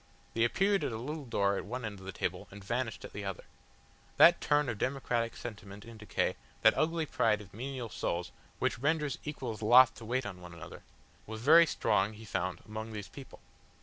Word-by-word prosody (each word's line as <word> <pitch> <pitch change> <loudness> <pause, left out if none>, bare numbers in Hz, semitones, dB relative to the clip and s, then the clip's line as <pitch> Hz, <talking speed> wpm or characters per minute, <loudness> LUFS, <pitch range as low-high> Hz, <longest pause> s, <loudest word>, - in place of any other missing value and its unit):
They 115 - +2
appeared 195 - +2
at 140 - -1
a 110 - -4
little 145 +5 -5
door 100 -4 +1
at - - -3
one 125 +3 -5
end 105 -2 -6
of 95 - -12
the - - -3
table, - - -3
and 100 +1 -11
vanished 120 +2 -3
at - - -11
the 105 - -5
other. 95 -1 -5 0.7
That 175 +1 +7
turn 145 -1 +2
of 115 -4 -3
democratic 125 -3 -1
sentiment 105 -3 -8
in 115 -1 -11
decay, 105 -1 -1 0.3
that - - +7
ugly 160 +1 +1
pride 105 -7 +1
of 100 -2 -13
menial 125 +1 -5
souls, 85 -2 -3 0.3
which - - -1
renders 150 +1 0
equals 125 -8 -5
loth 125 +4 +7
to 115 - -9
wait 125 +3 -1
on 95 -3 -7
one 90 -1 -10
another, 85 +1 -10 0.5
was 110 0 -6
very 165 +6 +7
strong 105 -6 +1
he 110 +1 -11
found 95 -3 -3
among 110 +1 -6
these 105 -2 -6
people. 135 -2 -12
115 Hz, 205 wpm, -32 LUFS, 105-135 Hz, 0.7 s, That